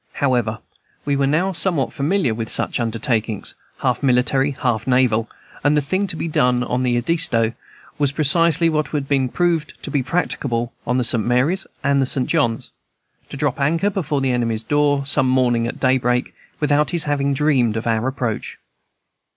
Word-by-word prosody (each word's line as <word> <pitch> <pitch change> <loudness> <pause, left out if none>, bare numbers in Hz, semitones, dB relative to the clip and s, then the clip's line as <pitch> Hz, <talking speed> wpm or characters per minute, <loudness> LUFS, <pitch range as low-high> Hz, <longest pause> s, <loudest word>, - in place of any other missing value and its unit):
However, 120 -5 0 0.5
we 145 -1 +1
were 140 0 +1
now 175 +7 +1
somewhat 165 -5 0
familiar 145 - 0
with 110 0 -5
such - - 0
undertakings, 115 -2 -1 0.3
half - - 0
military, 135 +1 +2
half 125 -5 -2
naval, 125 -3 +2 0.3
and 145 +1 +3
the - - +5
thing 185 +8 -1
to 175 - -4
be 165 - -3
done 125 -5 +2
on 125 0 -1
the 125 -1 +1
Edisto 120 -5 +1 0.5
was 145 -2 +2
precisely 165 +2 +3
what 155 -1 -1
we - - +1
had 135 -2 -1
proved 170 -4 0
to - - -5
be 145 - +1
practicable 120 -6 -2
on 125 +1 +1
the 125 - +1
St. 120 -2 +1
Mary's 135 +11 +1 0.2
and 140 -1 +2
the 130 - +1
St. 130 -1 +1
John's, 120 -9 0 0.6
to - - -7
drop 145 -1 -1
anchor 165 +8 +1
before 155 -7 -2
the 135 -1 +1
enemy's 115 -2 -1
door 145 +1 +1
some 135 -2 +2
morning 120 -3 +2
at - - -6
daybreak, 125 -1 +1 0.3
without 150 0 +2
his 170 -2 -1
having 140 -1 0
dreamed 130 -6 +2
of 110 - -4
our 115 +1 0
approach. 125 -5 -3
135 Hz, 175 wpm, -20 LUFS, 120-150 Hz, 0.6 s, the